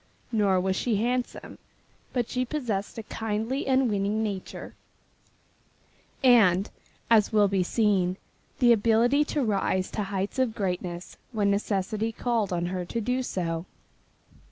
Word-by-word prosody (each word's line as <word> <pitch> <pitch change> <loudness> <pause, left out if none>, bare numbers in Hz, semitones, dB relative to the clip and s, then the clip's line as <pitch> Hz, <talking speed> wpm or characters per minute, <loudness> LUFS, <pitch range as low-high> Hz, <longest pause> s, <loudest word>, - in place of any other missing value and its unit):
Nor 200 -5 +3
was 190 +1 0
she 230 +3 0
handsome. 245 +4 -2 0.5
But 245 -3 -1
she 255 - -1
possessed 235 -8 -3
a 225 - -5
kindly 225 +5 -3
and 265 -1 +3
winning 205 +1 0
nature, 200 -4 -5 1.5
and, 210 -7 +5 0.4
as 215 -3 +5
will 210 -2 +4
be 195 -1 +1
seen, 190 -2 +1 0.4
the 240 -2 +6
ability 230 +6 +3
to 290 -1 -1
rise 195 -3 0
to 215 - -2
heights 195 +5 -3
of 245 -4 +1
greatness 180 -3 -4 0.2
when 205 -2 +2
necessity 205 +2 -1
called 225 -3 -1
on 175 -1 -1
her 180 0 -3
to 230 +6 -4
do 250 +4 0
so. 170 -7 -3
210 Hz, 135 wpm, -27 LUFS, 190-235 Hz, 1.5 s, the